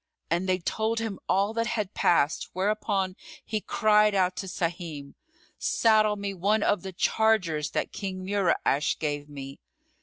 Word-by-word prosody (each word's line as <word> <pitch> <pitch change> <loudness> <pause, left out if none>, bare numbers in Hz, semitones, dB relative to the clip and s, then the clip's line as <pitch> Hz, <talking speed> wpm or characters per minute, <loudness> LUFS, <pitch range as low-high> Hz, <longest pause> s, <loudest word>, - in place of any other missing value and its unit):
And 175 +3 0
they 185 - +3
told 220 +5 -1
him 225 -4 -3
all 200 +3 +2
that 230 0 0
had 215 -3 -2
passed, 155 -3 +2
whereupon 195 -1 0 0.3
he 215 -1 -2
cried 210 -1 +3
out 185 -1 +2
to 190 - -4
Sahim, 165 -5 -4 0.5
"Saddle 215 -2 +3
me 200 -1 -4
one 205 +3 +1
of 205 -3 +2
the 190 - -6
chargers 180 -6 +1
that - - -2
King 185 -2 -5
Mura'ash 185 -7 +1
gave 145 -1 -3
me." 140 -1 -8
190 Hz, 150 wpm, -27 LUFS, 170-215 Hz, 0.5 s, they